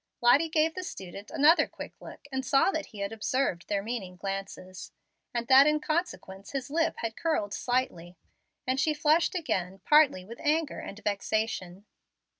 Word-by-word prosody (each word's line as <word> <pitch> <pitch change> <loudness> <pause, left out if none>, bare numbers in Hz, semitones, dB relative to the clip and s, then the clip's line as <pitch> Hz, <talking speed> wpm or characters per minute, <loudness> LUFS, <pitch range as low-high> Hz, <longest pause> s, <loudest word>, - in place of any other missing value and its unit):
Lottie 275 +7 +4
gave 315 0 +2
the 370 - -5
student 195 - -8
another 310 +5 +5
quick - - -9
look - - -11
and 265 0 -2
saw 275 +7 +3
that 315 -3 -3
he 205 - -9
had 200 - -2
observed 225 -4 -1
their 200 -1 -1
meaning 205 -5 -5
glances, 190 -1 -6 0.4
and 235 -1 -3
that 270 +2 +8
in 300 0 +3
consequence 305 - -3
his 275 -1 -4
lip 325 +1 +1
had 225 -1 -3
curled 215 -12 -1
slightly; 180 -9 -2 0.5
and 260 +1 0
she 305 +2 +2
flushed 315 +4 +2
again, 190 - -2
partly 295 -11 +5
with 230 +4 -10
anger 310 0 0
and 200 - -8
vexation. 205 -2 -2
245 Hz, 165 wpm, -28 LUFS, 195-300 Hz, 0.5 s, that